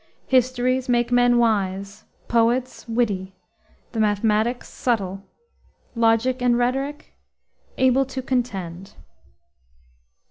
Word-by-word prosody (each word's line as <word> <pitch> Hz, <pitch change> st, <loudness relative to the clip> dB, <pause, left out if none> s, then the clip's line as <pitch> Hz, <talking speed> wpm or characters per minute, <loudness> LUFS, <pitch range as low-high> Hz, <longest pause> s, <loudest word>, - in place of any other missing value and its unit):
Histories 255 Hz, 0 st, +1 dB
make 240 Hz, 0 st, +1 dB
men 245 Hz, 0 st, +4 dB
wise; 200 Hz, -2 st, -1 dB, 0.2 s
poets, 240 Hz, +2 st, 0 dB
witty; 205 Hz, -5 st, -1 dB, 0.6 s
the 225 Hz, -, -4 dB
mathematics, 215 Hz, +3 st, +1 dB
subtle; 195 Hz, -6 st, -2 dB, 0.7 s
logic 230 Hz, +2 st, +2 dB
and 245 Hz, -1 st, +3 dB
rhetoric, 270 Hz, +4 st, -2 dB, 0.6 s
able 260 Hz, +1 st, +3 dB
to 265 Hz, 0 st, -6 dB
contend. 195 Hz, -8 st, -3 dB
240 Hz, 85 wpm, -23 LUFS, 210-255 Hz, 0.7 s, men